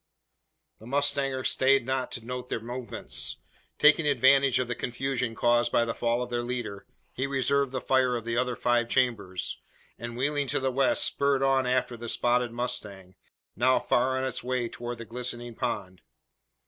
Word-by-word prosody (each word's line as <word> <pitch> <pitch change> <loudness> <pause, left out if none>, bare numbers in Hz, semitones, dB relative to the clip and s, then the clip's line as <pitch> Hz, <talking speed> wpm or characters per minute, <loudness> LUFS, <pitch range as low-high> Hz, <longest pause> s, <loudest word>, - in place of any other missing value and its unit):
The 110 - -13
mustanger 140 -1 0
stayed 135 -1 +3
not 130 0 -2
to 115 - -6
note 125 0 -6
their - - -2
movements. 120 +2 -4 0.4
Taking 150 +1 +5
advantage 135 -1 +4
of 130 - -1
the 120 - -1
confusion 125 -1 -2
caused 120 +1 +2
by 115 - +3
the 115 - -2
fall 120 +1 0
of 120 - -8
their 120 0 0
leader, 120 -5 -5 0.3
he 135 +2 -2
reserved 140 0 +1
the 130 - -2
fire 130 -2 +2
of 115 -2 -4
the 115 0 -2
other 125 0 0
five 120 -1 +1
chambers; 110 -9 0 0.4
and, 120 0 -6
wheeling 145 +2 0
to - - +1
the 130 0 0
west, 135 +1 +3
spurred 140 -1 +1
on 135 -1 +2
after 125 -1 0
the 120 0 -6
spotted 120 0 +1
mustang, 110 -6 -4 0.4
now 130 +4 +3
far 130 +2 +1
on 130 - -1
its 130 -3 -3
way 125 -1 -1
towards 120 +1 -6
the 115 - -8
glistening 120 +1 -4
pond. 95 -4 -4
125 Hz, 175 wpm, -27 LUFS, 120-130 Hz, 0.4 s, Taking